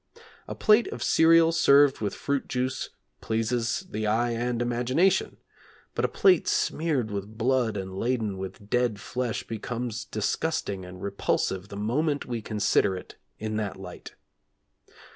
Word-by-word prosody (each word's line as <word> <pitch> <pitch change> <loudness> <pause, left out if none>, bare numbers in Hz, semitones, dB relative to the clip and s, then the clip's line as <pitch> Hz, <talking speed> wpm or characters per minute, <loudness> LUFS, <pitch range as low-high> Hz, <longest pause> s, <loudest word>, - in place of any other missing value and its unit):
A - - -5
plate 215 +2 +4
of - - -5
cereal 165 0 +5
served 145 -4 +5
with 105 - -2
fruit 140 -1 -2
juice 130 +1 -2 0.3
pleases 115 - -1
the 110 -11 -3
eye 120 +3 +1
and 120 +1 -1
imagination, 125 +9 +1 0.6
but - - -2
a - - +4
plate 185 -4 +3
smeared 145 -9 0
with 100 +2 -5
blood 120 -2 +1
and 95 -1 -5
laden 110 -3 -1
with 95 +2 -7
dead 120 -2 +1
flesh 125 +1 -3
becomes 115 +1 -4
disgusting 105 - -2
and 90 0 -10
repulsive 100 -1 -1
the 100 - -8
moment 140 +8 0
we 120 -2 -4
consider 105 -2 +1
it - - -11 0.2
in 110 0 -3
that 105 -2 -3
light. 90 -2 -10
115 Hz, 140 wpm, -27 LUFS, 105-135 Hz, 0.6 s, cereal